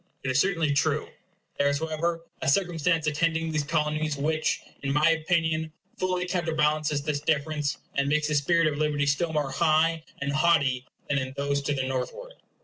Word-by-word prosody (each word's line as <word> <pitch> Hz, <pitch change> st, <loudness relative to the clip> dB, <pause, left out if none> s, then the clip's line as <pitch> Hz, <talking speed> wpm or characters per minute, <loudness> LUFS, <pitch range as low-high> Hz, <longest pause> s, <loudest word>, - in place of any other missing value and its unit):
It 130 Hz, -, 0 dB
is 130 Hz, -, +2 dB
certainly 165 Hz, -5 st, +2 dB
true. 140 Hz, -, +1 dB, 0.5 s
There 140 Hz, -, +4 dB
is, 145 Hz, -, +1 dB
however, 160 Hz, +2 st, -2 dB, 0.2 s
a -, -, -2 dB
circumstance 165 Hz, -1 st, +1 dB
attending 160 Hz, +1 st, 0 dB
these 155 Hz, -1 st, +1 dB
Colonies 155 Hz, -1 st, -1 dB
which, 155 Hz, +2 st, 0 dB, 0.2 s
in 140 Hz, -, -2 dB
my 150 Hz, +2 st, +4 dB
opinion, 160 Hz, -1 st, 0 dB, 0.2 s
fully 185 Hz, -1 st, -1 dB
counterbalances 155 Hz, -4 st, 0 dB
this 150 Hz, -1 st, -1 dB
difference, 150 Hz, -1 st, -1 dB, 0.2 s
and 140 Hz, 0 st, 0 dB
makes 150 Hz, +1 st, +2 dB
the 155 Hz, -, -1 dB
spirit 165 Hz, +4 st, +3 dB
of 150 Hz, -1 st, 0 dB
liberty 150 Hz, -2 st, +1 dB
still 155 Hz, +4 st, +1 dB
more 150 Hz, -3 st, -1 dB
high 160 Hz, +2 st, +2 dB, 0.2 s
and 140 Hz, 0 st, -2 dB
haughty 140 Hz, -6 st, +2 dB, 0.2 s
than 140 Hz, -1 st, +1 dB
in 130 Hz, 0 st, -4 dB
those 140 Hz, 0 st, 0 dB
to 140 Hz, +1 st, -1 dB
the 135 Hz, -, -1 dB
northward. 135 Hz, -, -4 dB
155 Hz, 175 wpm, -27 LUFS, 145-165 Hz, 0.5 s, There